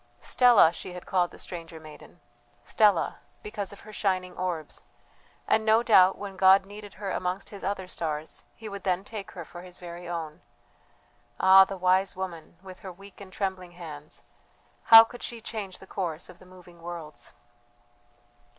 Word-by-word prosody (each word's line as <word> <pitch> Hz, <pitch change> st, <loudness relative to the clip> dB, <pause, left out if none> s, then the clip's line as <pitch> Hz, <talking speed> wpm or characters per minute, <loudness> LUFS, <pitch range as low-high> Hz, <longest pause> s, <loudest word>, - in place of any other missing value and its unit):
Stella 240 Hz, -9 st, +5 dB
she 180 Hz, -, -8 dB
had 180 Hz, 0 st, -9 dB
called 180 Hz, -2 st, +1 dB
the -, -, -15 dB
stranger 165 Hz, -2 st, -8 dB
maiden 155 Hz, -1 st, -14 dB, 0.4 s
Stella, 205 Hz, -6 st, +2 dB, 0.2 s
because 210 Hz, -2 st, -5 dB
of 200 Hz, -, -13 dB
her 215 Hz, -, -13 dB
shining 185 Hz, -3 st, -1 dB
orbs; 175 Hz, -4 st, -4 dB, 0.7 s
and 220 Hz, -, +2 dB
no 220 Hz, +2 st, +4 dB
doubt 190 Hz, -5 st, +5 dB
when 195 Hz, -2 st, -8 dB
God 190 Hz, +1 st, +6 dB
needed 205 Hz, 0 st, -11 dB
her 195 Hz, -1 st, -5 dB
amongst 180 Hz, +2 st, -3 dB
His 200 Hz, -2 st, -10 dB
other 190 Hz, -1 st, -3 dB
stars, 155 Hz, -3 st, -4 dB
He 225 Hz, -, -10 dB
would 200 Hz, -1 st, -7 dB
then 185 Hz, 0 st, -1 dB
take 210 Hz, -1 st, -8 dB
her 175 Hz, -3 st, -8 dB
for 175 Hz, -, -11 dB
His 180 Hz, 0 st, -11 dB
very 175 Hz, 0 st, -9 dB
own. 160 Hz, -3 st, -5 dB, 1.0 s
Ah, 190 Hz, 0 st, +8 dB
the 195 Hz, 0 st, -7 dB
wise 185 Hz, +2 st, +2 dB
woman, 175 Hz, -3 st, -7 dB
with 185 Hz, -1 st, -11 dB
her 190 Hz, -, -8 dB
weak 195 Hz, +3 st, -15 dB
and 190 Hz, -1 st, -11 dB
trembling 185 Hz, -2 st, -4 dB
hands, 155 Hz, -4 st, -10 dB, 0.6 s
how 225 Hz, 0 st, +11 dB
could 240 Hz, +2 st, -11 dB
she 235 Hz, -, -6 dB
change 210 Hz, -4 st, -6 dB
the -, -, -14 dB
course 175 Hz, -4 st, -5 dB
of 180 Hz, -, -14 dB
the 185 Hz, -, -17 dB
moving 180 Hz, -2 st, -16 dB
worlds! 160 Hz, -7 st, -9 dB
185 Hz, 170 wpm, -27 LUFS, 175-200 Hz, 1.0 s, how